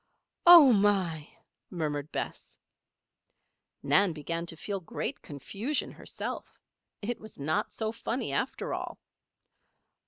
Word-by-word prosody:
"Oh 330 Hz, -7 st, +11 dB
my!" 190 Hz, -7 st, +1 dB, 0.4 s
murmured 150 Hz, -3 st, -3 dB
Bess. -, -, -5 dB, 1.3 s
Nan 200 Hz, -4 st, +4 dB
began 165 Hz, +3 st, -4 dB
to 165 Hz, -, -3 dB
feel 200 Hz, +4 st, -3 dB
great 175 Hz, -, -4 dB
confusion 200 Hz, -, -4 dB
herself. -, -, -6 dB, 0.5 s
It 240 Hz, +3 st, -2 dB
was 220 Hz, 0 st, -12 dB
not 155 Hz, +3 st, -1 dB
so 220 Hz, -1 st, -3 dB
funny, 230 Hz, +2 st, -3 dB
after -, -, -2 dB
all! -, -, -5 dB
195 Hz, 105 wpm, -29 LUFS, 160-220 Hz, 1.3 s, Oh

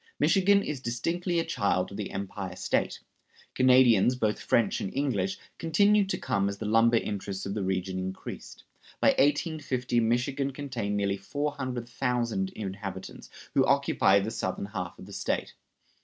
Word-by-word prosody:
Michigan 200 Hz, 0 st, +4 dB
is 150 Hz, -3 st, -3 dB
distinctly 170 Hz, +9 st, -1 dB
a 165 Hz, -, +1 dB
child 100 Hz, -, 0 dB
of 100 Hz, -, -7 dB
the 105 Hz, -, -4 dB
Empire 95 Hz, -1 st, -5 dB
State. -, -, -1 dB, 0.5 s
Canadians, 125 Hz, -3 st, +5 dB
both 110 Hz, -4 st, 0 dB
French 115 Hz, -4 st, +1 dB
and 95 Hz, -, -3 dB
English, 110 Hz, -9 st, 0 dB, 0.2 s
continued 200 Hz, +5 st, +3 dB
to -, -, 0 dB
come 100 Hz, 0 st, 0 dB
as 100 Hz, -, -5 dB
the 110 Hz, -, -5 dB
lumber 115 Hz, +2 st, +4 dB
interests 100 Hz, -3 st, -3 dB
of 100 Hz, -, -3 dB
the 105 Hz, -, -2 dB
region 95 Hz, 0 st, -2 dB
increased. 95 Hz, +1 st, -7 dB, 0.4 s
By -, -, +5 dB
1850 140 Hz, -4 st, +1 dB
Michigan 125 Hz, +4 st, 0 dB
contained 125 Hz, -8 st, -3 dB
nearly 100 Hz, -1 st, 0 dB
400,000 125 Hz, -4 st, -2 dB
inhabitants, 95 Hz, -2 st, -7 dB, 0.2 s
who -, -, +4 dB
occupied 100 Hz, 0 st, +3 dB
the 110 Hz, -, -3 dB
southern 115 Hz, -3 st, -3 dB
half 90 Hz, -4 st, -5 dB
of -, -, -11 dB
the -, -, -11 dB
State. -, -, -2 dB
115 Hz, 150 wpm, -28 LUFS, 100-135 Hz, 0.5 s, Canadians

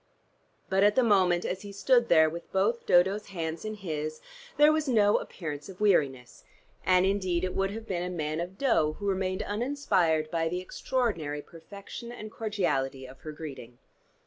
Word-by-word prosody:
But 190 Hz, 0 st, +1 dB
at 205 Hz, 0 st, +4 dB
the 260 Hz, -, +4 dB
moment, 185 Hz, -5 st, +3 dB
as 185 Hz, +1 st, -3 dB
he 205 Hz, -, -8 dB
stood 235 Hz, +4 st, +2 dB
there 160 Hz, -2 st, +6 dB
with 170 Hz, +2 st, -7 dB
both 210 Hz, +5 st, 0 dB
Dodo's 190 Hz, +4 st, +3 dB
hands 165 Hz, -4 st, -4 dB
in 215 Hz, 0 st, -4 dB
his, 155 Hz, -6 st, -4 dB, 0.4 s
there 295 Hz, +1 st, +7 dB
was 310 Hz, -1 st, 0 dB
no 210 Hz, -5 st, +4 dB
appearance 150 Hz, -3 st, -6 dB
of 185 Hz, -, -11 dB
weariness, 140 Hz, -, +1 dB, 0.4 s
and 185 Hz, 0 st, +4 dB
indeed 185 Hz, -3 st, 0 dB
it 185 Hz, -, -1 dB
would 195 Hz, 0 st, 0 dB
have 220 Hz, +2 st, -7 dB
been 180 Hz, -5 st, -2 dB
a 180 Hz, -, -3 dB
man 155 Hz, -3 st, -3 dB
of 180 Hz, +3 st, -5 dB
dough 160 Hz, -, +2 dB
who 205 Hz, -, -8 dB
remained 185 Hz, -1 st, -1 dB
uninspired 200 Hz, -, 0 dB
by 165 Hz, -1 st, 0 dB
the 180 Hz, +2 st, -2 dB
extraordinary 185 Hz, -, -2 dB
perfection 200 Hz, +7 st, -10 dB
and 215 Hz, -3 st, -8 dB
cordiality 175 Hz, -13 st, -1 dB
of 130 Hz, 0 st, -13 dB
her 155 Hz, -, -7 dB
greeting. 135 Hz, -6 st, -9 dB
185 Hz, 175 wpm, -28 LUFS, 160-210 Hz, 0.4 s, there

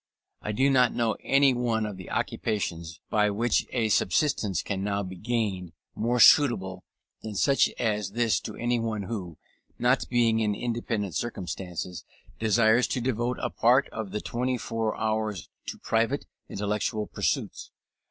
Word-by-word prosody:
I 105 Hz, -, -3 dB
do 130 Hz, +6 st, +2 dB
not 125 Hz, -2 st, +4 dB
know 115 Hz, -2 st, +1 dB
any 135 Hz, -1 st, +4 dB
one 115 Hz, -3 st, 0 dB
of 105 Hz, -2 st, -5 dB
the 95 Hz, -2 st, -10 dB
occupations 85 Hz, -6 st, -3 dB
by 105 Hz, -1 st, +3 dB
which 115 Hz, +4 st, +1 dB
a 115 Hz, -3 st, 0 dB
subsistence 105 Hz, -, +1 dB
can 95 Hz, -2 st, -3 dB
now 100 Hz, 0 st, -1 dB
be 95 Hz, 0 st, -7 dB
gained, 100 Hz, -5 st, -2 dB, 0.2 s
more 120 Hz, +2 st, 0 dB
suitable 95 Hz, -11 st, +5 dB, 0.4 s
than 110 Hz, -2 st, -6 dB
such 135 Hz, +7 st, +3 dB
as 105 Hz, -4 st, -1 dB
this 115 Hz, -1 st, +2 dB
to -, -, -7 dB
anyone 115 Hz, -3 st, -1 dB
who, 95 Hz, -6 st, -5 dB, 0.4 s
not 125 Hz, +2 st, +1 dB
being 115 Hz, -2 st, +3 dB
in 105 Hz, -2 st, +1 dB
independent 115 Hz, -5 st, -2 dB
circumstances, 90 Hz, -5 st, -4 dB, 0.4 s
desires 110 Hz, +2 st, +3 dB
to -, -, -2 dB
devote 120 Hz, 0 st, -1 dB
a -, -, -1 dB
part 125 Hz, +4 st, +3 dB
of 110 Hz, -3 st, -5 dB
the 105 Hz, -, -4 dB
twenty 125 Hz, +1 st, -1 dB
four 115 Hz, -2 st, -3 dB
hours 110 Hz, -3 st, -2 dB, 0.2 s
to -, -, -5 dB
private 115 Hz, +5 st, 0 dB, 0.2 s
intellectual 105 Hz, +1 st, -2 dB
pursuits. -, -, -2 dB
110 Hz, 150 wpm, -27 LUFS, 100-120 Hz, 0.4 s, suitable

